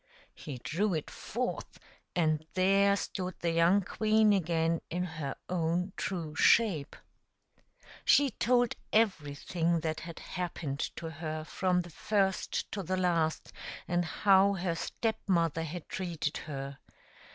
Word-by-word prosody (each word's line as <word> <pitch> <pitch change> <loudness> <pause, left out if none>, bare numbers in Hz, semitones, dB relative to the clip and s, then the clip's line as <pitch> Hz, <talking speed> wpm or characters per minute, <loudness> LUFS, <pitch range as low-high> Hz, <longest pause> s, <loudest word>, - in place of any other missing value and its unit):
He 140 -4 -7
drew 180 - -1
it 155 - -4
forth, 245 +3 -4 0.4
and 155 -3 +2
there 195 +2 +4
stood 185 -2 -4
the 170 - 0
young 170 +4 +4
queen 215 +2 +3
again 165 -3 +1
in 175 +2 -1
her 155 -5 -4
own 180 +2 0
true 165 -5 -3
shape. 180 -8 +3 1.1
She 280 -2 +5
told 245 +3 +2 0.2
everything 170 -4 +1
that 155 -1 -2
had 170 0 -8
happened 170 -6 -4 0.2
to 165 +1 -6
her 155 0 -4
from 180 +3 0
the 175 -1 -10
first 195 +2 0
to 205 - -3
the 185 +1 -2
last, 170 -3 0 0.3
and 175 0 +1
how 195 +3 +4
her 180 -2 -1
Step 220 +6 -2
mother 165 -4 +2
had 165 +1 -6
treated 170 -5 -3
her. 140 -2 -6
175 Hz, 130 wpm, -31 LUFS, 160-195 Hz, 1.1 s, She